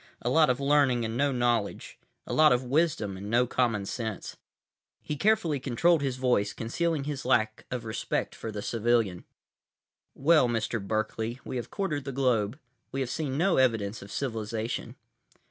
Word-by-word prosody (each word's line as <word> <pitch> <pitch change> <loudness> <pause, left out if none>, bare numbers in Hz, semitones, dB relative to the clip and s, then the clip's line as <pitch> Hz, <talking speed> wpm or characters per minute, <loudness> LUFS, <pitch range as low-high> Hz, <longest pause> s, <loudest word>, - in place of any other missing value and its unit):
A 120 - 0
lot 155 0 +5
of 125 +1 +1
learning 140 -4 +3
and 110 +1 -3
no 140 +3 +2
knowledge. 120 -4 -1 0.3
A - - -5
lot 155 0 +6
of 125 +1 +2
wisdom 130 - 0
and 100 +2 -7
no 120 +2 +3
common 115 -5 0
sense. 110 0 -5 0.6
He 150 - -4
carefully 165 -4 +2
controlled 145 +6 +2
his 135 -3 -1
voice, 125 -6 +1
concealing 160 +6 -1
his 140 -2 -4
lack 110 -4 +1
of 125 -2 -4
respect 110 - -2
for 115 - -6
the 105 -1 -5
civilian. 115 -6 0 0.9
"Well, 150 -1 +4
Mr. 115 -1 -1
Berkeley, 110 +3 -2
we 130 - -4
have 120 - -5
quartered 155 -9 -2
the 135 - -3
globe. 125 -3 +1 0.3
We 135 - -2
have 125 - -2
seen 140 -4 -2
no 175 +4 +2
evidence 115 -5 +1
of 100 - -11
civilization." 115 -1 -3
125 Hz, 165 wpm, -28 LUFS, 110-140 Hz, 0.9 s, lot